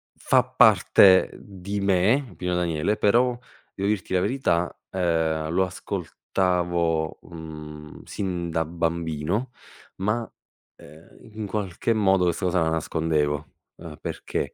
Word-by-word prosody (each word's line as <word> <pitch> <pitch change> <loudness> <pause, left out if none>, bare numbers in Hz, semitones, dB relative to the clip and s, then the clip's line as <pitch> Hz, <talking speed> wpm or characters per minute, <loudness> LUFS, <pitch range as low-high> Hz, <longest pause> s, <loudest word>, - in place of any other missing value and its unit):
fa 130 -1 +3
parte 110 -6 +5
di 100 0 -6
me, 100 +6 +2
Pino 90 +1 -2
Daniele, 90 +3 0
però, 120 +4 +3 0.4
devo 100 - -2
dirti 100 -3 -2
la 90 - +3
verità, 100 -7 0
ehm, 80 -3 0
lo 95 +3 +2
ascoltavo, 90 -3 -1
uhm, 75 -2 -10
sin 90 -4 -4
da 80 0 +1
bambino, 85 - -2 0.5
ma, 110 +4 -2 0.4
ehm, 75 +3 -16 0.2
in 110 -1 -5
qualche 100 +1 -1
modo 95 -4 +3
questa 90 +2 -1
cosa 90 0 +1
la 80 - +2
nascondevo. 75 -2 -1 0.3
Uhm, 80 -3 -9
perché - - -4
90 Hz, 120 wpm, -25 LUFS, 80-100 Hz, 0.5 s, parte